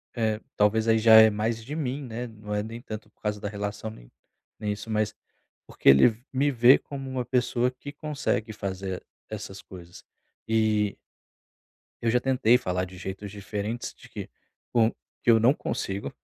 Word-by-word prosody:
eh, 110 -2 0 0.2
talvez 110 +2 +3
aí 115 0 +5
já 110 0 +7
é 110 0 +10
mais 110 +2 -1
de 145 +6 -6
mim, 140 -2 -2
né? 120 0 -5
Não 105 -2 -6
é 105 - 0
nem 115 +2 -7
tanto 110 -3 -8
por - - -42
causa 105 -1 -2
da 100 - -3
relação, 105 +1 -4
nem - - -13 0.5
nem 105 -1 -2
isso, 105 +2 -6
mas 105 -1 0 0.5
porque - - +2
ele 70 - +8
v 115 +3 -12
me 140 +2 +2
vê 125 +1 +7
como 135 -2 -7
uma 130 -1 -2
pessoa 125 0 +1
que 130 +3 -9
consegue 145 -7 -2
fazer 95 -2 -4 0.3
essas 95 0 -7
coisas. 90 -1 -13 0.4
E 110 -2 +2 1.1
eu 115 - +2
já 125 +2 +3
tentei 125 -2 +4
falar 90 -5 -2
de 90 0 -12
jeitos 95 +2 -6
diferentes 105 +3 -4
de - - -17
que - - -7 0.4
com 115 -1 +4 0.3
eu 115 -2 +6
não 120 +5 +5
consigo, 100 -8 -4
110 Hz, 175 wpm, -27 LUFS, 105-120 Hz, 1.1 s, é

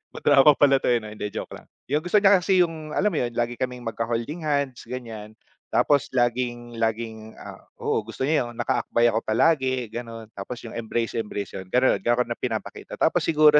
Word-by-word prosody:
Madrama 145 0 +5
pala 135 -2 +4
'to, - - 0
eh, 120 - +4
hindi, 105 -2 -6
joke - - -6
lang. - - -12 0.2
Yung 150 +1 +2
gusto 180 +5 +2
niya 200 -2 +5
kasi, 185 -1 +4
yung 160 -2 -8
alam 210 +1 +2
mo 155 - 0
'yon, 120 -1 -3
lagi 120 0 0
kaming 125 0 -4
magkaholding-hands 130 +5 -2
ganiyan, 110 -4 -7 0.3
tapos 145 -2 +2
laging 120 -1 -1
laging, 110 -1 -3
ah - - -10 0.2
oo, - - 0
gusto 115 +4 -6
niya 145 -5 +1
yung 120 - -12
nakaakbay 120 -2 +1
ako 110 - +2
palagi, 130 +1 +2
gano'n. 115 -1 -6
Tapos 100 +5 -6
yung 115 - -8
embrace, 115 0 -2
embrace, 105 -2 -5
'yon, 95 -1 -7
ganon, 125 +5 +3
gano'n 120 +1 +2
na - - -20
pinapakita. 115 -4 -5
Tapos - - +2
siguro 150 -2 +5
120 Hz, 185 wpm, -24 LUFS, 115-145 Hz, 0.3 s, Madrama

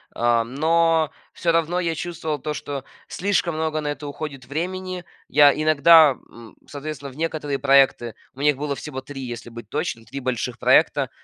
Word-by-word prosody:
э, 120 -1 +2
но 160 +5 +2 0.2
всё 170 - 0
равно 165 +2 +1
я 170 -2 -1
чувствовал 160 -2 -4
то, 150 +2 -4
что 140 -2 -5 0.2
слишком 190 -3 0
много 155 0 -1
на 150 -1 -3
это 145 0 -5
уходит 140 -3 -7
времени. 180 +4 -4 0.2
Я 145 -1 +6
иногда, 155 0 +6 0.2
м, 115 -1 -14
соответственно, 145 -1 -7
в - - -16
некоторые 150 -3 -2
проекты, 135 -5 +3 0.2
у 135 - -10
них 145 -1 +3
было 145 0 -3
всего 130 -1 -7
3, 135 +1 -9
если 120 -2 -7
быть 115 -2 -10
точным, 115 +1 -3
3 135 +3 -7
больших 125 -1 -3
проекта, - - +3
145 Hz, 170 wpm, -23 LUFS, 135-160 Hz, 0.2 s, Я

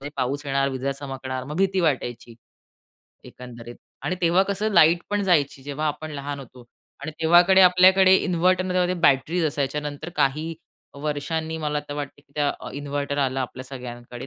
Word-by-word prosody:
म्हणजे 140 - -6
पाऊस 135 +3 -2
येणार, 135 0 +1
विजा 135 +1 -2
चमकणार 135 -2 -6
मग 150 +4 -7
भीती 190 0 +1
वाटायची 125 -7 -2 0.9
एकंदरीत 120 -1 -11 0.3
आणि 180 - -1
तेव्हा 175 +2 +4
कसं 200 +2 -2
लाईट 170 -1 +6
पण 205 0 0
जायची, 150 -8 +1
जेव्हा 145 +2 -3
आपण 155 +1 -4
लहान 145 0 -5
होतो 125 -2 -14 0.4
आणि 155 - -5
तेव्हाकडे 175 +4 +6
आपल्याकडे 185 +1 +6
इन्व्हर्टर 185 0 +1
नव्हते. 180 -1 +1
त्या - - -3
बॅटरीज 165 +3 +2
असायच्या, 145 -1 -2
नंतर 145 +2 -6
काही 155 +4 0 0.5
वर्षांनी 160 +2 -3
मला 150 -1 -2
तर 145 - -5
वाटतं, 145 -1 -6
की 140 - -32
त्या 145 -1 +1 0.2
इन्व्हर्टर 145 0 -3
आला 135 -1 0
आपल्या 130 0 -5
सगळ्यांकडे, 125 -1 -9
145 Hz, 165 wpm, -24 LUFS, 135-175 Hz, 0.9 s, लाईट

